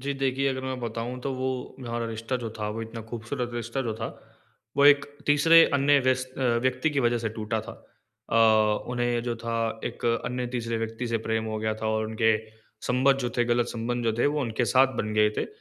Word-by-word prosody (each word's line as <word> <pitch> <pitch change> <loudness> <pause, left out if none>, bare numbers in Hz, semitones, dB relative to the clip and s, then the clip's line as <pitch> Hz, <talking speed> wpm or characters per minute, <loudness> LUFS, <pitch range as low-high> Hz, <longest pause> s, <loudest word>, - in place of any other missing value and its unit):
जी, 140 +2 -2
देखिए 135 0 0
अगर 130 -1 -2
मैं 130 -1 -3
बताऊँ 120 +2 -4
तो 135 +1 -3
वो 130 0 -1 0.4
हमारा 115 0 -2
रिश्ता 115 +3 -3
जो 115 - -3
था 105 -1 -2
वो 115 +2 -4
इतना 115 +1 -7
खूबसूरत 120 +2 -4
रिश्ता 120 +3 -3
जो 115 -3 -3
था, 110 +1 -4 0.7
वो 140 - +5
एक 145 -1 +7 0.2
तीसरे 165 +3 +7
अन्य 140 +1 +4
व्यस 130 0 +1
अ, - - -4 0.2
व्यक्ति 130 +4 +1
की 140 -2 0
वजह 120 -1 +2
से 115 - -2
टूटा 110 0 -3
था। 110 +1 -9 0.6
अ, - - +2 0.5
उन्हें 120 -1 0
जो 120 -1 -2
था 115 -1 -2
एक - - -5 0.2
अन्य 125 0 -2
तीसरे 115 -1 -2
व्यक्ति 115 +2 -4
से 115 -1 0
प्रेम 110 0 0
हो 110 0 -3
गया 110 0 -1
था 110 0 -4
और 110 0 0
उनके 110 0 +2 0.5
संबंध 130 +2 +3
जो 120 -2 -1
थे, 120 - +4
गलत 120 0 +1
संबंध 120 +1 -3
जो 115 - +2
थे - - +3
वो 150 +1 0
उनके 120 -2 -1
साथ 130 +2 +3
बन 105 0 -1
गए 105 0 +4
थे। - - -1
120 Hz, 220 wpm, -26 LUFS, 115-130 Hz, 0.7 s, एक